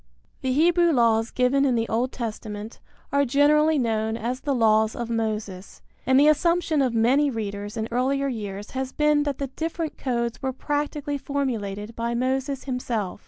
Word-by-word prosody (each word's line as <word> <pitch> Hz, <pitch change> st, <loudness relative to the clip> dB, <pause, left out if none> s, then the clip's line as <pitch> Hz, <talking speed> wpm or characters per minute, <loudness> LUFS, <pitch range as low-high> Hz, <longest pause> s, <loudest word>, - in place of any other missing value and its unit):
The 260 Hz, -, -1 dB
Hebrew 340 Hz, +4 st, +4 dB
laws 230 Hz, -4 st, +3 dB
given 255 Hz, +2 st, +2 dB
in 260 Hz, -3 st, +2 dB
the 225 Hz, 0 st, 0 dB
Old 240 Hz, +4 st, 0 dB
Testament 215 Hz, -2 st, -6 dB, 0.3 s
are 280 Hz, +1 st, +3 dB
generally 295 Hz, +4 st, +3 dB
known 220 Hz, -3 st, 0 dB
as 240 Hz, +3 st, -3 dB
the 280 Hz, -2 st, -1 dB
laws 220 Hz, -2 st, +3 dB
of 235 Hz, -1 st, -4 dB
Moses, 215 Hz, -4 st, -4 dB, 0.2 s
and 260 Hz, 0 st, +5 dB
the 290 Hz, -, +6 dB
assumption 325 Hz, 0 st, +2 dB
of 250 Hz, -3 st, 0 dB
many 260 Hz, +6 st, +3 dB
readers 205 Hz, -2 st, -5 dB
in 220 Hz, 0 st, -2 dB
earlier 270 Hz, +3 st, +1 dB
years 205 Hz, -5 st, -5 dB
has 265 Hz, 0 st, -3 dB
been 300 Hz, 0 st, +2 dB
that 285 Hz, -2 st, -2 dB
the 275 Hz, -2 st, -4 dB
different 325 Hz, -1 st, -4 dB
codes 235 Hz, -3 st, -2 dB
were 265 Hz, -1 st, -2 dB
practically 290 Hz, +1 st, -2 dB
formulated 230 Hz, -7 st, -3 dB
by 235 Hz, +1 st, -2 dB
Moses 265 Hz, +2 st, -1 dB
himself. 235 Hz, -7 st, -3 dB
250 Hz, 165 wpm, -24 LUFS, 225-280 Hz, 0.3 s, the